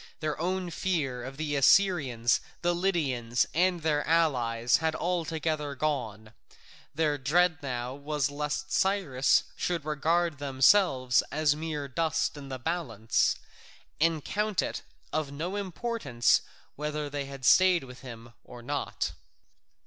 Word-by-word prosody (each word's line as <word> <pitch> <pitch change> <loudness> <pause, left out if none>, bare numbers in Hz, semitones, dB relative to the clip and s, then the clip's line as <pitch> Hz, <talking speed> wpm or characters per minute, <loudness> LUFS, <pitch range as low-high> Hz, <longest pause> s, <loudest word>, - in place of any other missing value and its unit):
Their 155 -1 -3
own 180 0 -1
fear 145 -9 -1
of 135 +2 -8
the 150 -1 -2
Assyrians, 140 - +3 0.2
the 175 0 +2
Lydians, 140 -10 0
and 175 0 +1
their 150 -2 +1
allies, 125 -8 +2
had 160 -1 -1
altogether 160 -4 -2
gone; 115 -7 -3 0.6
their 150 -2 +1
dread 165 +4 +2
now 125 -2 -4
was 145 0 -2
lest 150 0 -3
Cyrus 175 -9 +2
should 170 -4 -2
regard 160 +1 0
themselves 135 - +4
as 150 -1 +2
mere 150 -2 -4
dust 165 +4 -1
in 140 -2 -9
the 130 - -4
balance, 125 - 0 0.6
and 160 -1 +1
count 210 -1 0
it - - -4 0.3
of 155 -3 -1
no 165 +7 -4
importance 195 - 0 0.3
whether 150 0 -3
they 140 -1 -5
stayed 180 +4 +5
with 125 -2 -11
him 120 -2 -11
or 120 -1 -12
not. - - -2
150 Hz, 125 wpm, -28 LUFS, 130-170 Hz, 0.6 s, stayed